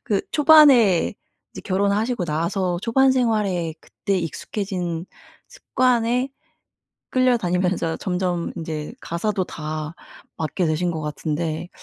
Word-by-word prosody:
그 200 -2 0
초반에 280 - +6 0.4
이제 - - -8
결혼하시고 200 +3 0
나서 175 +3 -1
초반 260 +5 +3
생활에 210 -10 0
그때 200 -2 -3
익숙해진 175 - -4 0.4
습관에 250 0 +1 0.8
끌려다니면서 185 -9 +1
점점 180 -2 -2
인제 160 -3 -5
가사도 190 +3 -2
다 155 -1 -5 0.4
맡게 160 +3 -1
되신 160 +3 0
것 160 -2 -4
같은데 155 +2 -3
185 Hz, 250 characters per minute, -22 LUFS, 165-225 Hz, 0.8 s, 초반에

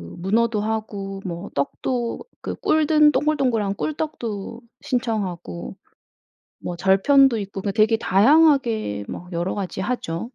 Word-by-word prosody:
문어도 215 +4 +1
하고 205 -3 -4
뭐 175 +2 -5
떡도 235 - -2 0.2
그 - - -4
꿀 310 -1 +1
든 300 -1 +5
동글동글한 255 -10 +1
꿀떡도 235 -7 -4 0.2
신청하고 200 - -3 0.9
뭐 175 - -5
절편도 230 +8 +4
있고 195 -1 -6
되게 220 +2 +3
다양하게 230 - +3
뭐 180 - -7
여러 175 +2 -2
가지 190 -2 -4
하죠. 190 -4 -3
215 Hz, 245 characters per minute, -22 LUFS, 190-255 Hz, 0.9 s, 든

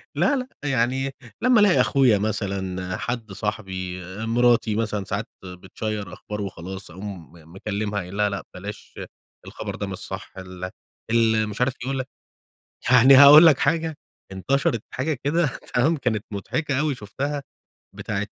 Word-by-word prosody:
لا، 290 - +3
لأ. 255 -2 -3 0.2
يعني 135 0 0 0.3
لمّا 250 -1 +5
ألاقي 205 -3 +5
أخويا 130 -6 +4
مثلًا، 95 -3 -3
حد 115 -3 -4
صاحبي، 95 -3 -4 0.2
مراتي 120 -1 +3
مثلًا 105 -2 -1
ساعات 100 +3 -3 0.2
بتشيّر 95 +2 -6
أخبار 105 +2 -6
وخلاص، 95 -1 -7
أقوم 95 -1 -8 0.2
مكلّمها 105 +1 -3
قايل 95 +1 -7
لها 105 0 +2
لأ 100 -1 -4
بلاش 100 +3 -9 0.5
الخبر - - -6
ده - - -4
مش - - -5
صح - - -7
ال 90 -1 -7 0.4
ال 110 -2 +3
مش 105 - -6
عارف 125 +1 +2
يقول 135 +1 -2
لك 130 - -4 0.8
يعني 130 +2 +8
هاقول 145 +4 +10
لك 155 -5 +6
حاجة 160 -2 0 0.4
انتشرت 115 +3 0
حاجة 150 +4 -1
كده 165 +4 +2 0.3
تمام؟ 150 +7 +3
كانت 115 -6 -1
مضحكة 130 +8 -2
أوي 150 -1 +1
شُفتها 140 +6 -4 0.5
بتاعة 105 -1 -3
110 Hz, 145 wpm, -24 LUFS, 100-135 Hz, 0.8 s, هاقول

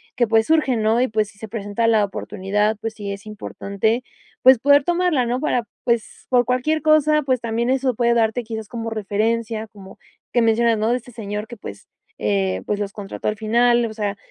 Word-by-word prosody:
que, 245 - +3
pues, 225 0 +3
surgen, 275 -8 +2
¿no? 225 +3 +3
Y, 255 - +2
pues, 215 -1 0
si 205 - -20
se 220 - -7
presenta 205 +1 -2
la 215 -2 +4
oportunidad, 205 +2 -1
pues 225 0 -3
sí, 200 -2 -5
es 200 +2 -10
importante, 215 +2 -2 0.4
pues, 260 -2 +7
poder 285 +1 +5
tomarla, 345 -7 +1
¿no?, 245 +2 -1
para, 245 -6 0 0.2
pues, 235 -2 -2
por 245 -2 +3
cualquier 265 +6 0
cosa. 305 -1 +4
Pues, 255 -3 0
también 235 +1 -1
eso 260 -1 +1
puede 235 0 +2
darte, 230 +1 +1
quizás, 220 -1 -6
como 230 -1 -4
referencia, 220 +1 -1
como 195 -2 -14 0.3
que 240 - +3
mencionas, 230 0 +3
¿no?, 220 +2 +1
de 245 - +2
este 245 0 -12
señor 210 -1 -5
que, 235 -1 -10
pues, 100 - -10 0.4
eh, 95 -2 0
pues, 205 - -1
los 200 - -3
contrató 205 0 -4
al 210 - -3
final. 235 +2 +3
O 220 - -8
sea, 205 -2 -3
225 Hz, 205 wpm, -21 LUFS, 210-245 Hz, 0.4 s, pues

